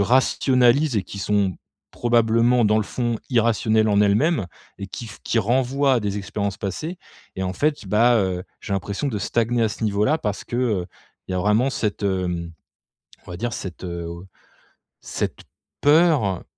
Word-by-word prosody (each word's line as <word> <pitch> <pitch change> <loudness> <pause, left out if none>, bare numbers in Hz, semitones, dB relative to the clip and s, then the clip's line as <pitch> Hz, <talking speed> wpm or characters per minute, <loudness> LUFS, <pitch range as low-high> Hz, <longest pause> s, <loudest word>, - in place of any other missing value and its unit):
rationalise 125 +3 +3
et 100 - +1
qui 100 - -9
sont, 100 -2 0 0.4
probablement, 120 0 +3
dans 105 0 +3
le - - +1
fond, 120 +1 -2
irrationnelles 110 -2 +2
en 100 -1 +3
elles-mêmes. 105 - +2 0.3
Et 100 - -5
qui 115 - -7
f - - -11
qui 115 - +1
renvoient 130 +5 +2
à 120 - +1
des 105 -1 -2
expériences 100 0 -3
passées 155 - -4 0.4
et 95 - -3
en 90 - -2
fait, 145 - -1
bah, 115 +4 +4
heu, 95 -4 0 0.2
j'ai 100 - -5
l'impression 100 +7 -2
de 110 -6 -2
stagner 115 +3 0
à 110 - +2
ce 110 - -7
niveau-là. 105 +9 +2
Parce 105 -5 -3
que, 120 - -5
heu, 110 -8 0 0.4
il - - -3
y - - -1
a - - 0
vraiment 105 +7 +2
cette, 105 -5 -2
hem, 90 -3 -1 0.7
on - - -10
va 85 - -5
dire 120 +6 -3
cette, 95 -4 -6
heu, 85 -1 -5
au 85 +2 -8 0.8
cette - - -4 0.4
peur, 145 - +3
110 Hz, 175 wpm, -22 LUFS, 100-120 Hz, 0.8 s, bah